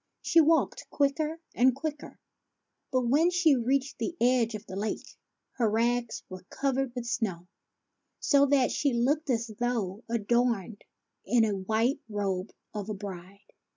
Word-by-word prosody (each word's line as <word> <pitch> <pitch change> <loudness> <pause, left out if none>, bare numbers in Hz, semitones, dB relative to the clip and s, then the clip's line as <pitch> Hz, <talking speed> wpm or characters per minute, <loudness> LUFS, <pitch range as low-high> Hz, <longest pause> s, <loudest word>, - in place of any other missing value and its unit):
She 330 - +5
walked 320 +1 +1
quicker 300 +3 0
and 250 +1 +4
quicker; 300 +1 -6 0.7
but, 255 - +1
when 285 +8 +3
she 345 -5 +4
reached 265 +3 0
the 345 - -3
edge 240 -2 +2
of 210 - -8
the 190 - -8
lake, 210 +2 -4 0.4
her 230 -4 +2
rags 235 +2 0
were 185 -1 -9
covered 270 -2 -1
with 245 -1 -4
snow, 210 -8 -2 0.7
so 280 -3 +4
that 275 -2 +3
she 280 -3 +1
looked 285 +6 +1
as 230 -2 0
though 230 -4 -1
adorned 230 -2 0 0.4
in 235 +3 +3
the 210 -2 +1
white 220 +7 0
robe 195 -2 -2 0.2
of 210 -1 -5
a 215 - -2
bride. 195 0 -9
240 Hz, 150 wpm, -29 LUFS, 210-275 Hz, 0.7 s, She